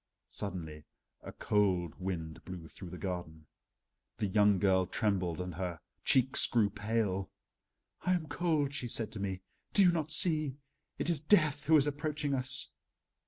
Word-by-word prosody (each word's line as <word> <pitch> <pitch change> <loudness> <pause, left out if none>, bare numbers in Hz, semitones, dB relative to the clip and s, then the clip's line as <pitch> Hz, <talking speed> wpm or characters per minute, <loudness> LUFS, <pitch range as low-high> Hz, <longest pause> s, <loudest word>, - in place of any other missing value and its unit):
Suddenly 80 -6 -6 0.4
a - - -8
cold 95 -5 +1
wind 85 -4 -5
blew 90 -3 -8
through 90 +1 -10
the 90 - -8
garden. 85 -5 -5 0.7
The - - -1
young 105 0 +4
girl 95 -1 +2
trembled 90 -5 -1
and 90 -1 -4
her 90 -1 -4 0.2
cheeks 130 +1 +4
grew 110 -4 +2
pale. 100 -2 -1 0.7
"I 185 - +1
am 175 -3 -1
cold," 150 -2 0
she 130 -3 -3
said 110 -2 -1
to 110 - -7
me, 95 -2 -3 0.3
"do 200 - +6
you 180 - +6
not 160 -3 -2
see? 155 -4 +3 0.4
It 175 - +1
is 155 -5 -1
Death 155 -4 +3
who 160 0 +7
is 145 - +4
approaching 145 0 -2
us." 130 -1 -1
105 Hz, 160 wpm, -32 LUFS, 90-145 Hz, 0.7 s, who